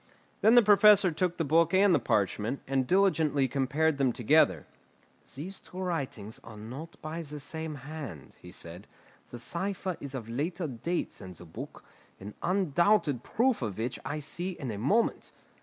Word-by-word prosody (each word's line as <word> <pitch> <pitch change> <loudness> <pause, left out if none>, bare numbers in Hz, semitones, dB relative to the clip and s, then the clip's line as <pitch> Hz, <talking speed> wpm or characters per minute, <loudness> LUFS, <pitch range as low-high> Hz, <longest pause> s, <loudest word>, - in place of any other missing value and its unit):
Then 220 +3 +6
the 240 - +8
Professor 205 -2 +6
took 175 +2 -1
the 165 - 0
book 165 +4 +3
and 195 0 +5
the - - +4
parchment, 105 +5 0
and 135 -1 0
diligently 160 -8 +3
compared 140 +3 0
them 130 -2 +3
together. 115 - +3 0.7
"These 180 +8 -6
two 180 - -14
writings 140 - -4
are 110 -2 -11
not 130 +10 -9
by 155 +2 -4
the 150 -2 -7
same 160 +2 -5
hand," 140 - -8
he 90 - -11
said; 85 +2 -9 0.4
"the 120 - -8
cipher 185 +7 -3
is 140 -1 -7
of 120 -4 -6
later 160 +9 -2
date 155 +6 -3
than 90 -1 -10
the 90 - -13
book, 80 - -9 0.4
an 100 +2 -8
undoubted 175 - +2
proof 240 - +1
of 105 -5 -3
which 120 +3 -3
I 150 - -3
see 175 +5 -4
in 135 -8 -5
a 100 - -5
moment. 205 - +1
150 Hz, 170 wpm, -29 LUFS, 120-180 Hz, 0.7 s, the